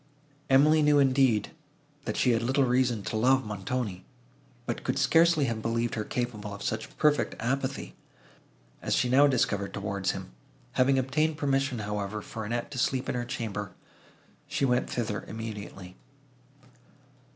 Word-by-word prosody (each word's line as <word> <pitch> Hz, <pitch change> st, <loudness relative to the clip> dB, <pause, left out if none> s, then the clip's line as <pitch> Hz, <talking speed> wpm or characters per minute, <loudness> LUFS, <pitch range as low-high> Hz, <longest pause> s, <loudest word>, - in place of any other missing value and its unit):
Emily 150 Hz, +4 st, +5 dB
knew 150 Hz, -1 st, +4 dB
indeed, 130 Hz, -6 st, +3 dB, 0.5 s
that -, -, -3 dB
she 125 Hz, -, +3 dB
had 115 Hz, -1 st, +2 dB
little 135 Hz, +4 st, +2 dB
reason 125 Hz, -4 st, +1 dB
to -, -, -4 dB
love 130 Hz, +4 st, +3 dB
Montoni, 105 Hz, -1 st, -3 dB, 0.6 s
but 120 Hz, -, -4 dB
could -, -, -1 dB
scarcely 165 Hz, -3 st, +4 dB
have 115 Hz, -3 st, -2 dB
believed 115 Hz, +1 st, -1 dB
her 110 Hz, -, -2 dB
capable 105 Hz, -4 st, -4 dB
of 100 Hz, -, -9 dB
such 110 Hz, 0 st, -4 dB
perfect 150 Hz, -2 st, +2 dB
apathy, 135 Hz, +3 st, -2 dB, 0.9 s
as -, -, 0 dB
she 125 Hz, -, +1 dB
now 140 Hz, +3 st, +6 dB
discovered 120 Hz, -7 st, 0 dB
towards 100 Hz, -2 st, -2 dB
him; -, -, -4 dB, 0.4 s
having 135 Hz, +1 st, +3 dB
obtained 150 Hz, +4 st, +1 dB
permission, 135 Hz, -3 st, 0 dB
however, 105 Hz, -1 st, -3 dB
for 110 Hz, -2 st, -6 dB
Annette 120 Hz, +5 st, -3 dB
to 130 Hz, -, -4 dB
sleep 130 Hz, +1 st, 0 dB
in -, -, 0 dB
her 120 Hz, -1 st, -2 dB
chamber, 110 Hz, -7 st, -4 dB, 0.7 s
she 140 Hz, -, 0 dB
went 125 Hz, -1 st, +1 dB
thither 115 Hz, -4 st, -2 dB
immediately. 105 Hz, -4 st, -7 dB
120 Hz, 150 wpm, -28 LUFS, 105-135 Hz, 0.9 s, now